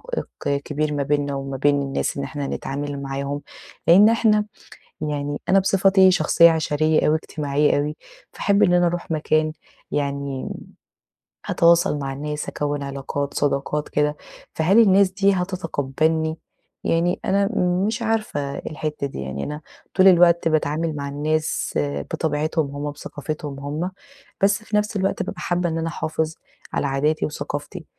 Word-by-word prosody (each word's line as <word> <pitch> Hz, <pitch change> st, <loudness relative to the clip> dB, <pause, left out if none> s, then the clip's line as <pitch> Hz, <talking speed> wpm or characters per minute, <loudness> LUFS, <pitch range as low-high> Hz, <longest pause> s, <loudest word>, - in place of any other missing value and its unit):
عائق 140 Hz, 0 st, -3 dB
كبير 150 Hz, 0 st, -2 dB
ما 140 Hz, -1 st, 0 dB
بيننا 145 Hz, 0 st, 0 dB
وما 135 Hz, -1 st, -4 dB
بين 145 Hz, +1 st, +2 dB
الناس 135 Hz, 0 st, -2 dB
إن 140 Hz, -, -2 dB
إحنا 140 Hz, +1 st, -4 dB
هنتعامل 140 Hz, 0 st, -4 dB
معاهم؟ 140 Hz, +1 st, -3 dB, 0.5 s
لإن 200 Hz, +6 st, +8 dB
إحنا 215 Hz, -2 st, +3 dB, 0.6 s
يعني 145 Hz, -1 st, -3 dB
أنا 195 Hz, -, +5 dB
بصفتي 190 Hz, 0 st, +5 dB
شخصية 170 Hz, 0 st, +5 dB
عشرية 155 Hz, -1 st, +1 dB
أوي 155 Hz, -, +4 dB
اجتماعية 145 Hz, -2 st, 0 dB
أوي، 150 Hz, +1 st, -2 dB, 0.4 s
فاحب 200 Hz, 0 st, +2 dB
إن 180 Hz, -3 st, +5 dB
أنا 175 Hz, 0 st, +4 dB
أروح 170 Hz, -1 st, -3 dB
مكان، 155 Hz, 0 st, +1 dB, 0.4 s
يعني 140 Hz, -2 st, -2 dB
م -, -, -6 dB, 1.0 s
هاتواصل 170 Hz, -2 st, +3 dB
مع 135 Hz, -1 st, -3 dB
الناس، 150 Hz, +2 st, -4 dB
هاكوِّن 145 Hz, -1 st, -2 dB
علاقات 140 Hz, +1 st, -4 dB
صداقات 145 Hz, +1 st, -1 dB
كده، 150 Hz, 0 st, 0 dB, 0.4 s
فهل 185 Hz, +8 st, +4 dB
الناس 195 Hz, -2 st, +5 dB
دي 195 Hz, +1 st, +3 dB
هتتقبلني؟ 160 Hz, -3 st, -1 dB, 0.5 s
يعني 170 Hz, +2 st, +1 dB
أنا 200 Hz, +1 st, +2 dB, 0.4 s
مش 225 Hz, +2 st, -2 dB
عارفة 215 Hz, -12 st, -1 dB
الحِتّة 150 Hz, -2 st, -4 dB
دي، 65 Hz, -, -7 dB
يعني 65 Hz, +1 st, -4 dB
أنا 150 Hz, +1 st, -5 dB, 0.3 s
طول 190 Hz, 0 st, +5 dB
الوقت 170 Hz, -2 st, +5 dB
باتعامل 155 Hz, 0 st, 0 dB
مع 140 Hz, -1 st, -4 dB
الناس 155 Hz, +2 st, -1 dB, 0.4 s
بطبيعتهم 150 Hz, -1 st, -1 dB
هُم، 145 Hz, 0 st, -3 dB
بثقافتهم 145 Hz, -1 st, -6 dB
هُم، 150 Hz, +6 st, -3 dB, 0.5 s
بس 205 Hz, +2 st, +3 dB
في 210 Hz, -, -4 dB
نفس 210 Hz, +1 st, -1 dB
الوقت 195 Hz, 0 st, 0 dB
بابقى -, -, -6 dB
حابة 175 Hz, -1 st, 0 dB
إن 165 Hz, -, -2 dB
أنا 165 Hz, 0 st, -2 dB
أحافظ 160 Hz, 0 st, -2 dB, 0.4 s
على 145 Hz, -, 0 dB
عاداتي 150 Hz, +3 st, +1 dB
وثقافتي، 150 Hz, +3 st, -5 dB
155 Hz, 145 wpm, -22 LUFS, 145-175 Hz, 1.0 s, لإن